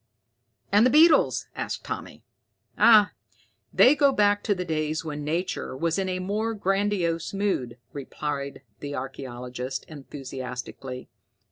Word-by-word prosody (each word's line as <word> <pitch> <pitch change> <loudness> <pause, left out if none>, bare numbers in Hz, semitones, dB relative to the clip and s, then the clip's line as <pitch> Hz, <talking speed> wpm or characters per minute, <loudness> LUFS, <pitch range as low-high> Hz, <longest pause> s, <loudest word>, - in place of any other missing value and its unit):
"And 205 +2 +6
the 250 - +5
beetles?" 310 +3 +5
asked - - -4
Tommy. - - -6 0.5
"Ah, 215 -3 +6 0.6
they 260 - +6
go 285 -2 +4
back 205 -4 +3
to 205 - +2
the 180 -1 -4
days 155 -1 -2
when 150 -1 -5
nature 160 -3 -3
was 165 +5 0
in 190 -1 -1
a 185 - -1
more 210 +5 -2
grandiose 195 -4 0
mood!" 135 - -1 0.2
replied 140 -1 -5 0.2
the 145 0 -5
archaeologist 130 -1 -6
enthusiastically. 130 -3 -7
165 Hz, 125 wpm, -26 LUFS, 135-205 Hz, 0.6 s, And